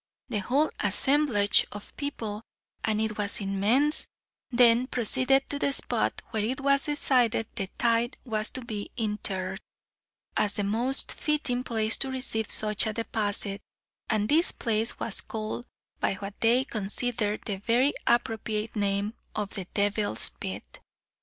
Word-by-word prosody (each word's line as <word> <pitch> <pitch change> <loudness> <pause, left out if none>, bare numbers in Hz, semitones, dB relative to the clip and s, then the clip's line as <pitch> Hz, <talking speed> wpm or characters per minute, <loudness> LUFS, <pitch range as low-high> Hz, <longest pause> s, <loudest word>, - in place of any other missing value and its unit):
The 220 -4 0
whole 270 +10 +1
assemblage 210 0 +3
of 205 0 -10
people, 225 -8 -4 0.4
and 215 -1 +1
it 215 -1 -2
was 205 -1 +2
immense, 215 +10 +2 0.4
then 245 0 +5
proceeded 260 +3 +2
to 285 - -2
the 280 - +1
spot - - +1
where 215 -2 -1
it 250 +5 -2
was 275 0 +2
decided 250 -6 +2
the 195 -4 -3
tithe 235 +1 +1
was 215 -3 -1
to 255 -2 -5
be 210 -3 -5
interred, 195 -4 -2 0.8
as 210 -1 +2
the 205 - -1
most 235 +7 +3
fitting 290 -5 0
place 220 -2 +1
to 270 - -1
receive 245 -4 -2
such 215 0 +1
a 215 - -2
deposit, 205 -3 -1 0.5
and 215 -1 +1
this 320 +6 +5
place 225 0 -1
was 220 - -1
called 220 +2 -5 0.3
by - - 0
what 195 +1 -7
they 235 +3 +4
considered 215 -1 -1
the 200 -3 -2
very 240 +7 +2
appropriate 225 -2 0
name 200 +1 0 0.2
of 205 -2 -2
"The 190 - -5
Devil's 205 +1 +1
Bit." - - -7
220 Hz, 145 wpm, -27 LUFS, 205-250 Hz, 0.8 s, then